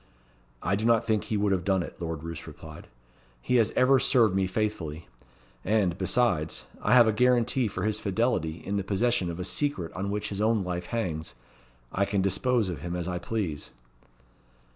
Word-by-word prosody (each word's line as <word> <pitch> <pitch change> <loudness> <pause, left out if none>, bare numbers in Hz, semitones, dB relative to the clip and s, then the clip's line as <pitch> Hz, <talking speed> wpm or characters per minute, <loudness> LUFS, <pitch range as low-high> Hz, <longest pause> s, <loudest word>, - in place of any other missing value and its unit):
"I 100 - +1
do 105 - -3
not 115 0 +3
think 110 -2 0
he 110 - -1
would 100 0 +1
have 95 -2 +1
done 95 -2 +1
it," - - -10
Lord 80 -2 -4
Roos 85 -1 -7
replied. 80 0 -11 0.5
"He 125 - +1
has 110 -2 +4
ever 130 +1 +5
served 115 -7 +3
me 95 -1 +2
faithfully; 90 -7 -3 0.6
and, 100 -4 +1
besides, 95 -4 0 0.2
I - - +3
have 120 -2 +7
a 110 - +3
guarantee 125 +1 +2
for 95 -2 -4
his 110 0 0
fidelity 95 -6 -1
in 100 +1 -1
the 100 - -1
possession 100 0 +1
of 85 +1 -5
a - - -2
secret 95 - -2
on 95 +2 -3
which 105 +1 -2
his 100 0 -3
own 110 -1 +2
life 90 -1 -4
hangs. 80 - -3 0.6
I 100 - +1
can 100 -1 0
dispose 115 +3 +1
of 85 -6 -5
him 85 +2 -4
as 90 -1 -3
I 90 -1 -2
please." 90 -7 -3
100 Hz, 190 wpm, -27 LUFS, 90-115 Hz, 0.6 s, have